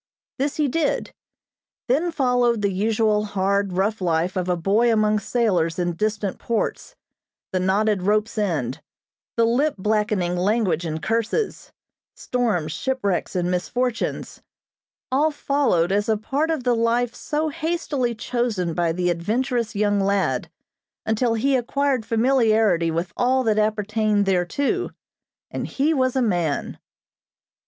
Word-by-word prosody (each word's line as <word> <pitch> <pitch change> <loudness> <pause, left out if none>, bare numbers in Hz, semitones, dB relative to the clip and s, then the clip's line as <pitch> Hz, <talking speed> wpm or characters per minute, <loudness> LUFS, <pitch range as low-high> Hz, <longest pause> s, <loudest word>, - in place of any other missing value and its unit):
This 280 +1 0
he 300 -2 +1
did. 295 +2 -1 0.7
Then 310 +8 +1
followed 245 -6 +1
the 200 - +2
usual 215 +2 +1
hard, 200 -1 0
rough 200 +3 0
life 170 0 0
of 185 -1 -1
a 180 - +1
boy 210 +7 +2
among 215 -1 +2
sailors 190 -8 0
in 175 -1 0
distant 210 +1 -2
ports; 235 - -2 0.6
the 185 - 0
knotted 200 +2 +1
rope's 210 +4 +1
end, 160 - -1 0.6
the 230 - +4
lip 270 +6 +1
blackening 210 -3 0
language 185 -2 +1
and 155 0 -4
curses, 230 - -1 0.4
storms, 215 -11 -1
shipwrecks 200 0 -2
and 180 0 0
misfortunes; 240 +7 -2 0.7
all 290 +4 +3
followed 275 - +1
as 205 +2 +1
a 220 - +3
part 280 +9 -1
of 315 -5 -1
the 245 -1 +2
life 230 +1 +1
so 305 +1 -2
hastily 300 -6 -2
chosen 220 -7 -1
by 170 0 +1
the 180 +1 0
adventurous 230 +6 -1
young 205 0 +2
lad, 200 0 0 0.6
until 225 +1 +1
he 270 +5 +2
acquired 260 -1 0
familiarity 220 -7 +3
with 170 +3 -3
all 260 +1 +2
that 215 -2 +2
appertained 215 -1 +1
thereto, 195 - 0 0.6
and - - -4
he 295 +4 +1
was 260 -3 +1
a 260 - +2
man. 175 -9 -1
215 Hz, 135 wpm, -23 LUFS, 185-250 Hz, 0.7 s, the